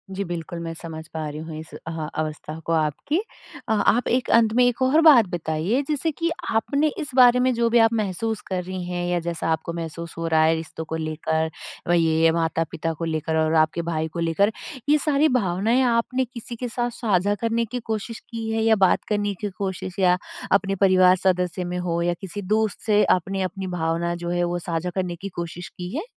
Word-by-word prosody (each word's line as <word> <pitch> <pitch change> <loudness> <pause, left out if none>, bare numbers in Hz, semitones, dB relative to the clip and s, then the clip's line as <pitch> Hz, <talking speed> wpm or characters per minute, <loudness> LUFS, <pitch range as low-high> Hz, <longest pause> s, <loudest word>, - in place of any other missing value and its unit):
जी, 200 - -1
बिल्कुल 170 -1 -5
मैं 165 -1 -5
समझ 160 -1 -8
पा 160 -1 -3
रही 150 +1 -7
हूँ 160 0 -7
इस 155 - -11
अ, - - -8 0.2
अवस्था 155 0 -4
को 165 - 0
आपकी। 155 - 0 0.5
अ, - - +2
आप 220 +3 +2
एक 250 +1 +1
अंत 225 -2 +5
में 250 +2 +4
एक 245 +1 0
और 270 +5 +4
बात 290 -9 +8
बताइए, 175 - -1
जैसे 305 +2 0
कि 335 +3 -1 0.2
आपने 280 +7 +1
इस 295 - -4
बारे 250 -1 +7
में 255 0 +3
जो 235 0 +1
भी 235 - +4
आप 225 0 +4
महसूस 215 +1 -1
कर 185 -1 -2
रही 185 0 -5
हैं 175 0 -3
या 175 - +1
जैसा 170 -1 -3
आपको 160 +1 -2
महसूस 170 0 -6
हो 165 0 -2
रहा 160 -1 +3
है, 160 +1 +4
रिश्तों 160 0 -6
को 160 - -4
लेकर, 160 0 -1 0.4
व - - +1
ये 160 0 +3
माता-पिता 165 0 -1
को 165 +1 -4
लेकर 160 0 -1
और 160 0 +2
आपके 155 +2 +2
भाई 160 -1 -2
को 170 - -4
लेकर। 170 +6 +2 0.4
ये 300 - +6
सारी 300 0 +2
भावनाएँ 225 +1 +2
आपने 250 +2 +1
किसी 235 -1 -8
के 250 +2 -4
साथ 240 +1 -1
साझा 205 -4 +1
करने 230 0 +1
की 245 +3 -4
कोशिश 225 0 -4
की 225 -2 -4
है 225 0 0
या 225 0 +5
बात 190 -3 +3
करने 205 -1 0
की 205 - -1
कोशिश 190 -1 -4
या 180 -1 +4 0.3
अपने 195 0 +2
परिवार 185 -1 +5
सदस्य 180 -1 +1
में 175 0 -3
हो 170 -1 -1
या 175 0 +1
किसी 195 +1 -6
दोस्त 215 +2 0
से 210 -1 +4
आपने 195 +2 +1
अपनी 190 +1 -3
भावना 170 -1 -1
जो 175 0 -5
है, 175 0 0
वो 175 0 -1
साझा 170 0 -3
करने 185 -2 -1
की 195 +4 -7
कोशिश 170 +1 -5
की 180 +5 -7
है? 325 - -2
185 Hz, 215 wpm, -23 LUFS, 165-225 Hz, 0.5 s, बात